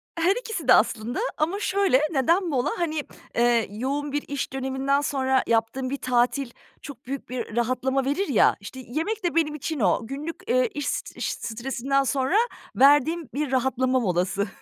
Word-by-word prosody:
Her 350 +5 +2
ikisi 445 - -5
de - - +8
aslında 230 - +2 0.2
ama 335 +6 0
şöyle, 390 -9 +2
neden 335 +6 +2
mola? 260 -5 0
Hani, 315 -3 -1 0.3
eee, 235 -2 +3
yoğun 280 +6 -3
bir 290 +1 -1
iş 280 -1 -4
döneminden 270 +1 0
sonra 265 -2 +1
yaptığın 230 +3 0
bir 280 - -2
tatil 250 +1 +1 0.3
çok 275 -5 -10
büyük 275 +1 -6
bir 245 -3 -5
rahatlama 255 +3 0
verir 290 +9 0
ya, 270 -8 +4
işte, 205 +6 -9
yemek 355 - -2
de 345 -2 -1
benim 305 -2 +2
için 305 +1 -4
o. 210 +2 +1
Günlük, 290 +6 -5
eee, 255 0 +3
iş 290 -1 -3
st - - -4
iş - - -2
stresinden 265 +4 -1
sonra 270 +5 0 0.4
verdiğim 290 +3 +4
bir 290 -1 -2
rahatlama 260 0 +1
molası. 195 0 0
270 Hz, 170 wpm, -25 LUFS, 245-300 Hz, 0.4 s, de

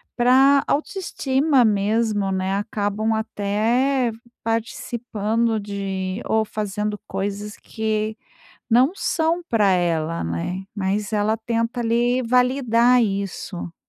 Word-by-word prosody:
pra 265 +3 +5
autoestima 285 -4 +1
mesmo, 210 -1 +1
né. 190 0 -1
Acabam 210 +1 -1
até 225 +5 0 0.3
participando 225 0 -1
de 195 -1 -4
ou 220 0 +2
fazendo 210 0 -3
coisas 205 +2 -4
que 220 -1 -3 0.5
não 250 +6 +5
são 335 -3 0
pra 210 -4 +3
ela, 165 -2 0
né, 85 - -3
mas 200 +1 -1
ela 215 +1 +1
tenta 230 +1 -2
ali, 240 +2 +1
validar 250 0 +3
isso. 195 -3 -4
220 Hz, 100 wpm, -22 LUFS, 200-240 Hz, 0.5 s, pra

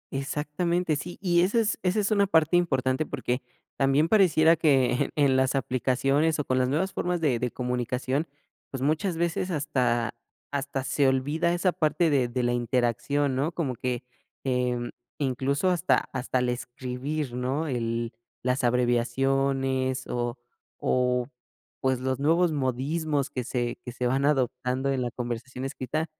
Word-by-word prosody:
Exactamente, 155 +4 -1
sí, 175 +4 -6
y 175 -2 +4
esa 200 +6 +2
es 220 -1 0
esa 185 +3 +1
es 205 +1 0
una 200 -2 +3
parte 160 -1 +3
importante, 135 -5 +2
porque, 130 -2 -2 0.4
también 140 +3 +3
pareciera 170 -6 +5
que 135 -6 +2
en 140 -3 +3
las 130 +1 +2
aplicaciones, 135 +5 +1
o 150 - -2
con 130 0 +1
las 125 - +2
nuevas 175 +8 0
formas 175 0 -1
de 140 -7 +1
de 125 0 -1
comunicación, 125 +4 -2 0.4
pues, 135 -1 -4
muchas 160 +4 0
veces 170 +2 -1
hasta, 125 -7 0 0.4
hasta 140 -1 -2
se 140 +1 +2
olvida 145 +6 +1
esa 175 +1 +2
parte 160 +1 +1
de 130 -4 +3
de 125 +1 -2
la 120 - +1
interacción, 120 +3 0
¿no? 145 +5 0
Como 145 -7 -1
que, 125 +1 -3 0.4
em, 125 -2 -1 0.3
incluso, 140 +6 0
hasta, 175 0 +2
hasta 130 0 -1
el 125 0 +1
escribir, 125 +3 -4
¿no? 130 +6 -1
El 115 -3 -2 0.3
las 125 +1 0
abreviaciones 130 +2 +1
o, 120 +1 -2 0.4
o, 125 -1 +1 0.5
pues, 130 -1 +1
los 130 0 -1
nuevos 165 +4 +3
modismos 145 +1 -1
que 125 -3 -3
se 120 0 -2
que 125 - -6
se 125 +1 -3
van 135 +3 +1
adoptando 130 -1 0
en 135 -2 0
la 120 - -1
conversación 125 +2 -5
escrita, 150 +3 -2
135 Hz, 155 wpm, -27 LUFS, 125-155 Hz, 0.5 s, pareciera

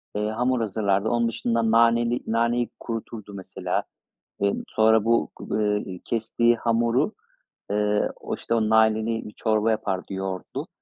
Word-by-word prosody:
eee, 105 +1 0
hamur 125 +3 0
hazırlardı. 100 -1 0
Onun 120 -1 +2
dışında 115 0 0
naneli 115 +1 +4
naneyi 115 +1 +1
kuruturdu 110 -3 -6
mesela. 95 -2 -3 0.6
Eee, 100 0 +2
sonra 110 -1 +4
bu 115 +1 +2
gu 110 - -3
eee, 105 -3 -1
kestiği 115 +1 +1
hamuru, 120 - +1 0.6
eee, 105 0 +1
o, - - -5
işte, - - -3
o 110 -1 +1
naneli 110 0 +2
bir 105 - -10
çorba 110 0 +1
yapardı 100 -3 -2
yoğurtlu. 95 -1 -4
110 Hz, 140 wpm, -25 LUFS, 105-115 Hz, 0.6 s, naneli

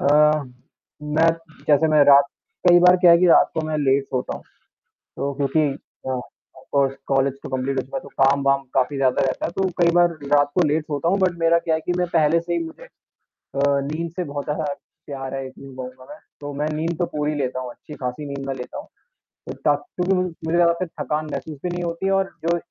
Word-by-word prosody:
अ, 150 +1 +4 0.6
मैं 155 +2 +2 0.4
जैसे 150 +2 +5
मैं 155 -1 +5
रात 140 0 +7 0.4
कई 175 0 +8
बार 180 +1 +7
क्या 175 -1 +6
है 170 - +7
कि 180 - +4
रात 170 - +5
को 160 - 0
मैं 155 -1 -2
लेट 135 -1 +2
सोता 130 -1 -3
हूँ। - - -13 0.8
तो 140 0 -2
क्योंकि 145 +2 +1 0.4
अ, - - -1
ऑफ़ 130 +1 -9
कोर्स 135 -1 +2
कॉलेज 135 0 +2
तो - - -6
कंप्लीट 130 +1 -2
हो - - +2
चुका 135 +1 -6
है, - - -5
तो - - -11
काम-वाम 140 0 +3
काफ़ी 135 +2 +1
ज़्यादा 130 -2 +2
रहता 130 - -2
है 170 - -3
तो 190 0 +1
कई 170 0 +5
बार 175 0 +5 0.2
रात 145 0 +4
को 180 - +4
लेट 150 +2 +1
सोता 150 +2 -1
हूँ, 195 - +2
बट 180 -2 +1
मेरा 165 0 +4
क्या 160 -1 0
है 160 - -3
कि 175 - 0
मैं 180 -1 0
पहले 160 0 +4
से 170 +1 -4
ही, 170 - +1
मुझे 160 - -10 0.5
अ, 140 - -9 0.3
नींद 165 +2 -3
से 180 - -2
बहुत 145 -1 -5
ज़्यादा 150 +1 -2 0.4
प्यार 135 -2 -6
है, 135 - -3
ये - - -7
चीज 135 0 -13
कहुँगा 130 0 -8
मैं। 200 - -9 0.2
तो 145 0 -5
मैं 150 +2 -2
नींद 165 +2 -2
तो 175 - +2
पूरी 150 0 0
लेता 130 -2 -2
हूँ 125 -1 -5
अच्छी-खासी 135 0 -7
नींद 140 -1 -5
मैं 135 - -1
लेता 125 - -7
हूँ। - - -10 0.6
तो - - -3
थक - - +2
क्योंकि 180 +1 +1
मुझे 185 0 0 0.2
मुझे 165 +2 0
ज़्यादा 170 -1 +5
थकान 155 -1 -4
महसूस 140 +2 -5
भी 180 - -2
नहीं 175 0 -3
होती 170 +3 -2
और 195 0 +1 0.2
जो 170 0 +2
150 Hz, 230 wpm, -22 LUFS, 135-170 Hz, 0.8 s, कई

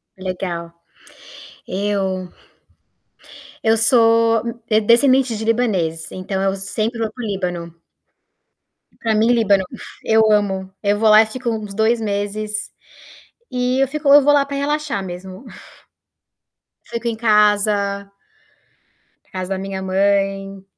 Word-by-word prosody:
Legal. 180 -3 -5 1.0
Eu 190 -2 -2 1.3
eu 225 0 +3
sou 230 -1 +4 0.3
d 215 0 +3
descendente 245 +2 +3
de 220 - -5
libaneses, 185 -9 -1
então, 190 +1 -4
eu 195 0 0
sempre 215 +4 -3
vou 220 -1 -2
para 245 - -8
o - - -3
Líbano. 175 -4 -4 1.2
Pra 225 -1 0
mim, 220 +2 +2
Líbano, 205 -5 +3
fu - - -10 0.3
eu 220 -1 +3
amo. 190 -2 0
Eu 205 0 +1
vou 220 -1 +4
lá 215 +1 +8
e - - +2
fico 240 +2 -5
uns 215 -3 -4
2 225 +2 +2
meses 210 0 -3 0.8
e 250 +1 0
eu 270 - +3
fico 300 +1 -4
eu 290 - +9
vou 290 +1 +4
lá 280 -1 +3
pra 280 0 -5
relaxar 290 -7 -2
mesmo. 185 +5 -9 1.4
Fico 235 0 -3
em 225 - -2
casa 205 -2 +2 1.2
casa 185 0 -5
da - - -3
minha 195 0 -5
mãe 195 0 0
210 Hz, 130 wpm, -19 LUFS, 195-230 Hz, 1.4 s, eu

